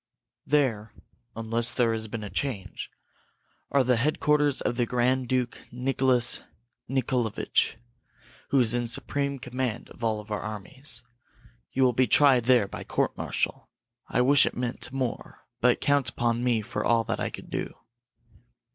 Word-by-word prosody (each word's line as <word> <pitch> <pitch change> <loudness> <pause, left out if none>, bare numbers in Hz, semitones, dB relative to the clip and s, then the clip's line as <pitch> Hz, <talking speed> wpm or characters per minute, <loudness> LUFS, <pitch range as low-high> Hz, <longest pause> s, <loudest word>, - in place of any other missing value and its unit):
There, 120 -8 +1 0.4
unless 115 +2 +1
there 120 -3 +2
has 110 0 -3
been 110 0 -5
a 105 - -6
change, 105 -2 -4 0.8
are 140 -1 +3
the 125 -1 +2
headquarters 150 +1 +2
of 120 - -1
the 120 -1 0
Grand 125 +1 +1
Duke 125 -1 -2
Nicholas 125 -1 +1 0.5
Nicholavitch, 125 -4 0 0.7
who 140 - +3
is 120 -2 +4
in 120 -1 0
supreme 140 +4 0
command 125 -2 -4
of - - -12
all 110 -2 -1
our 105 -1 -3
armies. 110 +8 -5 0.7
You 135 - +1
will 125 -1 +4
be 130 +2 +3
tried 135 -5 +5
there 120 -5 +4
by - - -7
court - - -1
martial. - - -2 0.4
I - - +1
wish 140 +3 +5
it - - -4
meant 125 0 -2
more 130 -3 -4
but 125 0 +3
count 145 -2 +2
upon 120 0 -1
me 120 -3 +1
for 115 - -3
all 115 -1 +3
that - - -3
I - - -1
can - - -9
do." - - -4
125 Hz, 155 wpm, -27 LUFS, 115-130 Hz, 0.8 s, tried